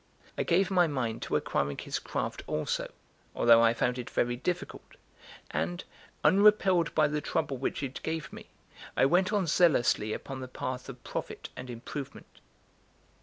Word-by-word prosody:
I - - -1
gave 185 +3 +2
my 180 -2 +4
mind 120 -6 -2
to - - -2
acquiring 70 0 0
his - - -3
craft - - -3
also, - - -2 0.4
although 115 -1 +6
I 115 0 +4
found 125 +1 0
it 120 - -6
very 120 0 0
difficult; 175 +8 -4 0.6
and, 85 +3 -2 0.4
unrepelled 195 -3 +4
by 155 -1 +5
the 150 0 -2
trouble 145 -4 -1
which 135 - -2
it 135 -1 -5
gave 160 -1 -4
me, - - -10 0.5
I - - +5
went 180 +7 +3
on 205 -3 +1
zealously 135 -10 +3
upon 135 +4 -5
the 130 - -6
path 130 +1 -5
of 125 -2 -10
profit - - -5
and 125 0 -8
improvement. 130 +4 -8
135 Hz, 160 wpm, -29 LUFS, 120-175 Hz, 0.6 s, although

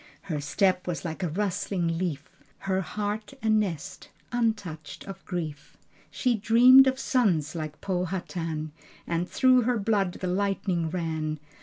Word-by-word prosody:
Her 155 -7 -3
step 185 +5 +1
was 175 -1 -3
like 160 +2 -4
a 180 - 0
rustling 180 -2 -1
leaf: 155 -6 -3 0.3
Her 190 -1 -1
heart 210 +6 -4
a 220 - +2
nest, 205 -8 -1 0.2
untouched 215 -10 -2
of 195 -1 -8
grief. 160 -6 -5 0.3
She 250 -2 +1
dreamed 240 +5 +7
of 260 0 +1
sons 195 - +1
like 155 -3 -6
Powhatan, 175 -4 -3 0.3
And 170 +1 -2
through 255 -1 +4
her 245 +1 +1
blood 200 -3 +1
the 185 - -6
lightning 185 -2 0
ran. 160 -3 -2
185 Hz, 140 wpm, -27 LUFS, 165-210 Hz, 0.3 s, dreamed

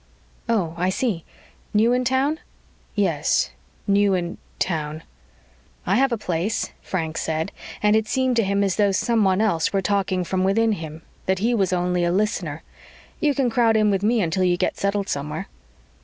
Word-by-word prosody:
"Oh, 190 -8 +1
I 180 +2 +1
see. 190 -4 -1 0.5
New 225 +3 +4
in 250 0 +1
town?" 270 +5 +1 0.6
"Yes, - - +1 0.3
new 200 -1 +3
in 175 -1 -3 0.2
town." 155 -2 -2 0.8
"I 190 - +2
have 270 0 +3
a 235 - 0
place," 185 +2 -2
Frank 165 -3 -3
said, 160 +3 -2 0.3
and 210 0 +5
it 220 0 +1
seemed 260 0 +1
to 230 - +4
him 200 +1 +1
as 195 -2 0
though 205 -2 +3
someone 205 -3 +2
else 170 -7 +1
were 195 - +1
talking 190 -2 +1
from 185 +1 -1
within 220 +4 +3
him 160 -4 -5 0.2
that 190 0 +2
he 225 +6 +1
was 195 -6 +1
only 180 0 +1
a 175 - +2
listener. 175 -6 -1 0.6
"You 295 -3 +2
can 255 -3 +1
crowd 225 -2 +3
in 210 -1 +3
with 195 -1 +1
me 225 +2 +2
until 175 +3 0
you 175 -1 +2
get - - 0
settled 200 0 -1
somewhere." 150 +6 -3
195 Hz, 175 wpm, -23 LUFS, 175-225 Hz, 0.8 s, and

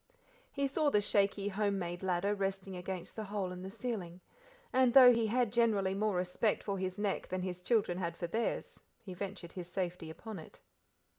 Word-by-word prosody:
He 280 -1 -1
saw 290 +2 +2
the 210 - +4
shaky, 200 -1 +2
home 205 0 0
made 175 -1 -4
ladder, 190 +2 +1
resting 195 -1 -3
against 180 0 -5
the 220 - -4
hole 200 -2 -2
in 180 0 -7
the 190 - -6
ceiling, 195 -6 -4 0.5
and 255 -1 +5
though 250 -2 +10
he 230 -1 +1
had 240 0 +1
generally 215 -5 +3
more 210 0 0
respect 180 +4 0
for 200 -2 -2
his 185 0 -3
neck 205 -2 -1
than 185 0 -3
his 180 -1 -4
children 200 -4 +1
had 170 -2 -3
for 175 - -3
theirs, 225 +7 -2 0.2
he 190 -4 -7
ventured 185 -2 -6
his 180 -2 -7
safety 180 -3 -3
upon 210 +4 -7
it. 155 - -13
195 Hz, 195 wpm, -33 LUFS, 180-215 Hz, 0.5 s, though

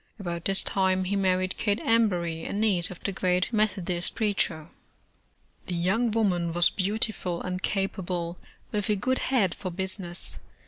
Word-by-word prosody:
About 170 -3 -4
this 195 0 +5
time 190 -1 +2
he 190 +2 -1
married 185 -1 +1
Kate 205 -1 +1
Embury, 180 -8 +1
a - - -4
niece 200 -5 +3
of 180 - -10
the 200 - -1
great 180 +2 0
Methodist 185 -5 -1
preacher. 200 -7 -1 1.0
The 180 - -3
young 195 +8 +1
woman 185 -7 +1
was 175 0 +4
beautiful 195 -3 -1
and 185 0 -4
capable, 180 -3 -2 0.3
with 210 -2 -2
a 210 - +3
good 255 +6 0
head 220 -9 +1
for 185 - -5
business. 185 -1 -1
190 Hz, 150 wpm, -27 LUFS, 175-205 Hz, 1.0 s, this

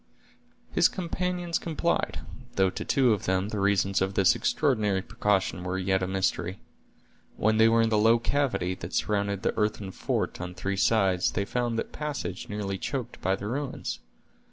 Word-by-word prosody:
His - - +5
companions 180 -1 -2
complied, 170 +1 -1 0.3
though 95 -2 +3
to - - -5
two 130 -4 +3
of 105 - -3
them 95 +2 0
the 105 - -3
reasons 100 -1 +2
of 95 +1 0
this 95 -1 +5
extraordinary 105 -10 +1
precaution 95 -5 0
were 90 +1 -2
yet 95 0 +1
a 90 - -1
mystery. 95 0 -1 0.8
When 110 +1 +2
they 110 +1 +6
were 115 0 +4
in 115 - +2
the 110 -1 +2
low 115 +2 +5
cavity 120 -7 0
that 90 0 -7
surrounded 100 -1 0
the - - 0
earthen 105 -2 -1
fort - - -2
on 90 0 -6
three 100 +2 -2
sides, 95 -3 +3
they 100 - -1
found 120 +1 -1
that - - -3
passage 145 -11 -4
nearly 100 -2 -3
choked 125 0 -4
by 95 +1 +1
the 100 - -7
ruins. 135 +5 -3
105 Hz, 175 wpm, -27 LUFS, 95-120 Hz, 0.8 s, they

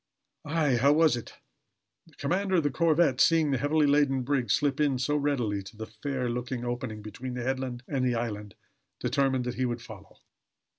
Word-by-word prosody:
Aye, 145 -4 +1
how 140 +4 +4
was 160 -3 +4
it? 120 - -8 0.7
The - - -21
commander 190 +1 0
of 165 - +3
the 145 - +1
corvette, 160 -5 +3
seeing 160 -3 +4
the 135 - +1
heavily 150 +3 +2
laden 140 -2 +3
brig 130 -2 0
slip 145 -1 +1
in 145 -3 +2
so 130 +4 0
readily 130 -9 0
to 100 +3 -13
the 110 - -5
fair 125 +4 -4
looking 125 +1 -3
opening, 120 -3 -4
between 125 +4 -6
the 125 - -3
headland 130 -1 -3
and 135 -3 -1
the 125 -1 +1
island, 105 -4 -4 0.4
determined 130 0 +1
that 125 - -2
he - - +3
would 120 -1 -3
follow. 105 -4 -12
130 Hz, 190 wpm, -28 LUFS, 120-145 Hz, 0.7 s, how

